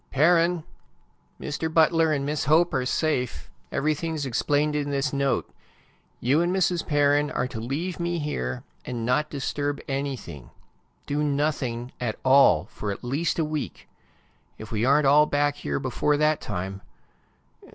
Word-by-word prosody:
"Perrin! 170 +3 +3 0.8
Mr. 155 +2 -3
Butler 160 0 +4
and 140 -2 0
Miss 150 +1 -1
Hope 160 +5 +4
are 125 - 0
safe. 130 -4 -1 0.2
Everything 155 +2 -1
is 145 -2 -3
explained 145 +4 +1
in 145 -1 -1
this 140 +1 -1
note. 140 -1 0 0.7
You 140 +6 +2
and 175 +1 +1
Mrs. 180 -2 +1
Perrin 145 0 +3
are 125 - -1
to 115 - -6
leave 150 +11 -3
me 170 0 -1
here, 65 - -3 0.2
and 120 -2 -4
not 150 +5 +1
disturb 145 0 -2
anything. 135 - -4 0.6
Do 145 +1 -1
nothing 140 -5 -1
at 115 -3 -2
all 130 - +6
for 105 0 -5
at 100 - -7
least 145 +6 -1
a 165 - +1
week. 150 -2 -5 0.7
If 110 - -10
we 110 0 -1
aren't 140 +2 +4
all 150 +2 +6
back 145 0 +1
here 70 -1 -3
before 150 0 0
that 150 0 +2
time 95 -1 -5
145 Hz, 150 wpm, -25 LUFS, 125-155 Hz, 0.8 s, all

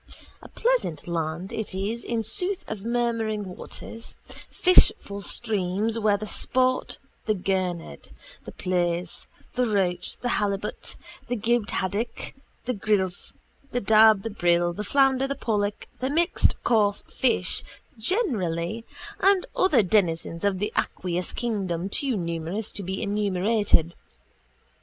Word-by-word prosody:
A - - -12
pleasant 480 - 0
land 170 +2 -3
it 220 -3 -3
is 210 +5 -2
in 230 -1 -1
sooth 360 - +1
of 215 -2 -5
murmuring 230 -3 0
waters, 230 0 -10 0.3
fishful 200 - +4
streams 210 +2 0
where 210 -2 +3
sport 255 +4 0 0.3
the 215 - +2
gurnard, 180 - -2 0.3
the - - -8
plaice, 175 -1 -2 0.3
the 250 -1 +1
roach, 185 -4 0
the 245 - -3
halibut, 205 0 -2 0.3
the 245 - -1
gibbed 230 -1 +1
haddock, 200 +5 -2 0.3
the 250 - 0
grilse, 195 -4 -1 0.4
the 245 - -1
dab, 215 -1 +6
the 225 - -3
brill, 175 -3 +2
the 210 - -4
flounder, 270 +2 +3
the 275 - -2
pollock, 210 -5 -1
the 260 - -1
mixed 335 +5 +3
coarse 210 -3 +2
fish 230 -8 0 0.4
generally 220 - 0 0.4
and 390 -1 +4
other 295 - +4
denizens 170 -4 +1
of 200 -2 +2
the 210 +3 -2
aqueous 180 -1 -1
kingdom 195 -6 -2
too 260 +2 0
numerous 170 +4 -3
to - - -5
be 190 0 -3
enumerated. 200 -3 +2
205 Hz, 125 wpm, -26 LUFS, 185-235 Hz, 0.4 s, dab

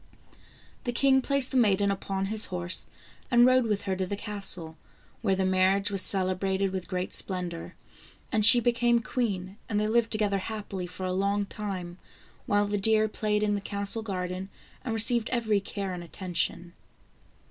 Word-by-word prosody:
The 245 - 0
king 265 +2 +4
placed 275 0 +1
the 265 - +1
maiden 200 -4 +3
upon 195 0 -2
his 215 +2 -1
horse 180 -1 -3 0.4
and 240 -2 +6
rode 255 -1 +4
with 210 -2 -1
her 190 -2 -1
to 185 -1 -1
the 200 - -2
castle, 195 -6 -3 0.5
where 195 -4 +2
the 190 0 0
marriage 190 +2 +2
was 195 -2 0
celebrated 190 0 +1
with 190 -1 -4
great 180 -1 -3
splendor, 180 -3 -3 0.6
and 215 -1 +2
she 240 +3 +8
became 240 0 +2
queen, 200 -6 -2
and 210 -1 +1
they 210 - +1
lived 230 +1 +2
to - - 0
gether 200 -2 +1
happily 195 -3 -5
for 185 +1 -6
a 185 - -1
long 200 +2 +1
time, 185 -4 -6 0.5
while 205 0 +3
the 205 0 -1
deer 215 +1 +3
played 210 0 -1
in 210 -1 +2
the 205 - -1
castle 200 +2 -3
garden 185 -2 -4 0.3
and 230 -3 -2
received 225 +1 +3
every 220 -4 +1
care 195 -1 -4
and 175 -1 -6
attention. 175 0 -3
200 Hz, 175 wpm, -28 LUFS, 185-220 Hz, 0.6 s, she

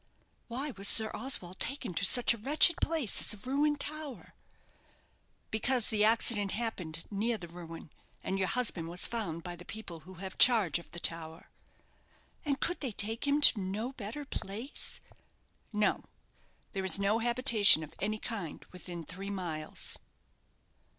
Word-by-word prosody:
"Why 270 +5 -3
was 200 -4 -1
Sir 220 +1 +7
Oswald 195 -7 -1
taken 265 -7 -2
to 170 - -2
such 240 +5 +4
a - - -8
wretched 300 +8 +4
place 310 -9 0
as - - -1
a 210 +5 -14
ruined 290 +2 0
tower?" 300 -2 -6 1.2
"Because 240 +2 0
the 210 -1 +1
accident 215 -2 +4
happened 180 -8 -4
near 220 +3 -1
the 175 -4 -10
ruin; 165 -2 -11 0.3
and 195 +1 -3
your 190 - 0
husband 190 -10 +1
was 175 +1 +2
found 190 -9 -4
by 175 -1 -7
the 175 - -12
people 180 -4 -9
who 185 +4 -14
have 190 +1 -9
charge 210 - +5
of 170 - -16
the 175 - -8
tower." 165 0 -3 0.9
"And 280 -1 -2
could 355 - -2
they 265 -5 -4
take 225 +7 0
him 285 +1 +1
to 240 - +8
no 205 +7 -4
better 245 +5 -7
place?" 225 +2 -4 0.7
"No. 210 -1 -1 0.7
There 195 -2 -4
is 190 - 0
no 200 +3 0
habitation 235 - +5
of 155 - -12
any 215 +2 -2
kind 210 -8 -7
within 175 -2 -9
three 190 +5 -8
miles." 170 -6 -3
210 Hz, 155 wpm, -30 LUFS, 180-245 Hz, 1.2 s, to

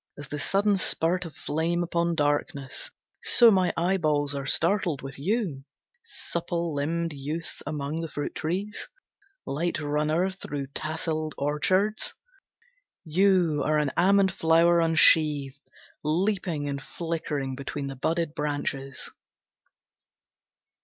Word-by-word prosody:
As 145 -1 -8
the 150 - -4
sudden 200 +5 +2
spurt 180 0 +1
of 160 -4 -9
flame 165 +3 -1
upon 170 0 0
darkness 145 -2 -1 0.3
So 235 -2 +7
my 185 -3 +3
eyeballs 155 -5 +1
are 140 -1 -4
startled 170 -5 +3
with 135 0 -7
you, 180 - -1 0.4
Supple 170 - -3
limbed 165 +3 -1
youth 150 +4 -5
among 150 +2 -3
the 165 - -3
fruit 145 -2 -4
trees, 190 +6 -3 0.6
Light 160 +4 -1
runner 155 +5 0
through 145 -7 -6
tasselled 155 0 -2
orchards. 185 +9 0 0.9
You 175 -2 +3
are 155 +2 +2
an 150 -2 +1
almond 190 +1 +4
flower 170 0 +4
unsheathed 150 -4 +4 0.4
Leaping 170 -1 0
and 140 -1 -3
flickering 155 -4 -3
between 140 +1 -5
the 135 0 -5
budded 165 +3 -1
branches. 140 -3 -3
160 Hz, 115 wpm, -27 LUFS, 145-175 Hz, 0.9 s, So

